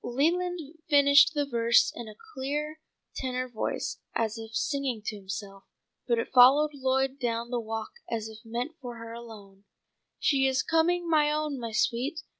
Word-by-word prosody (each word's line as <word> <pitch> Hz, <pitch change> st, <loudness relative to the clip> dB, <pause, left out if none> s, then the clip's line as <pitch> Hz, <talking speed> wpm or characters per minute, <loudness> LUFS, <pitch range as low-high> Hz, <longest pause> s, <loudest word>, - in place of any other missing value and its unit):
Leland 345 Hz, +8 st, 0 dB, 0.3 s
finished 285 Hz, +2 st, +6 dB
the 290 Hz, -1 st, +1 dB
verse 235 Hz, -3 st, +3 dB
in 235 Hz, -, -7 dB
a 215 Hz, -, -10 dB, 0.2 s
clear 295 Hz, +3 st, -3 dB, 0.4 s
tenor 255 Hz, -1 st, -2 dB
voice 235 Hz, -3 st, -3 dB, 0.2 s
as 225 Hz, -1 st, 0 dB
if 225 Hz, -1 st, -8 dB
singing 260 Hz, -2 st, -1 dB
to 215 Hz, -, -3 dB
himself, 195 Hz, 0 st, -7 dB, 0.4 s
but 235 Hz, -2 st, +2 dB
it 230 Hz, -, -3 dB
followed 270 Hz, +4 st, +7 dB
Lloyd 265 Hz, 0 st, 0 dB
down 235 Hz, -1 st, -2 dB
the 245 Hz, -, 0 dB
walk 225 Hz, -1 st, -5 dB, 0.2 s
as 220 Hz, -2 st, -3 dB
if 220 Hz, -1 st, -11 dB
meant 240 Hz, +6 st, -4 dB
for 245 Hz, -2 st, -7 dB
her 230 Hz, 0 st, -9 dB
alone: 210 Hz, -4 st, -12 dB, 0.5 s
"'She 270 Hz, -2 st, +2 dB
is 265 Hz, 0 st, +1 dB
coming, 340 Hz, +2 st, +1 dB
my 305 Hz, -2 st, +3 dB
own, 300 Hz, -2 st, -2 dB
my 230 Hz, -1 st, -5 dB
sweet! 255 Hz, +8 st, 0 dB
250 Hz, 165 wpm, -28 LUFS, 230-290 Hz, 0.5 s, followed